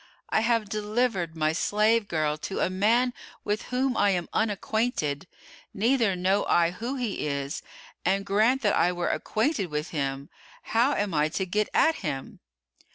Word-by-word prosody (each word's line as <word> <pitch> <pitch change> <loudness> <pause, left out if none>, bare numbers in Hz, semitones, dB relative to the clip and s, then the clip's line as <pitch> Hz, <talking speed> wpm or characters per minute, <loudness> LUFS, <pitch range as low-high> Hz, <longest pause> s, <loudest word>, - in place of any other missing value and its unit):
I - - +2
have 230 -1 +1
delivered 210 -4 -1
my 155 0 +1
slave 210 +5 +2
girl 155 -3 0
to 175 +5 -5
a 185 - +1
man 230 +6 +2 0.3
with 210 +1 -2
whom 255 0 0
I 205 - +3
am 175 -3 -1
unacquainted, 205 - -1 0.5
neither 230 -2 +2
know 190 +3 +1
I 170 0 +3
who 235 +9 -4
he 235 - -2
is; 140 +1 -3 0.4
and 195 +2 +1
grant 225 +7 +2
that 205 - +3
I 180 - +3
were 175 -1 -2
acquainted 220 - 0
with 150 +1 -3
him, 140 -2 -3 0.3
how 240 +6 +2
am 205 -3 -1
I 150 0 +2
to 190 +4 -2
get 210 +3 0
at 320 - +4
him?" 140 -7 -5
200 Hz, 160 wpm, -27 LUFS, 170-225 Hz, 0.5 s, at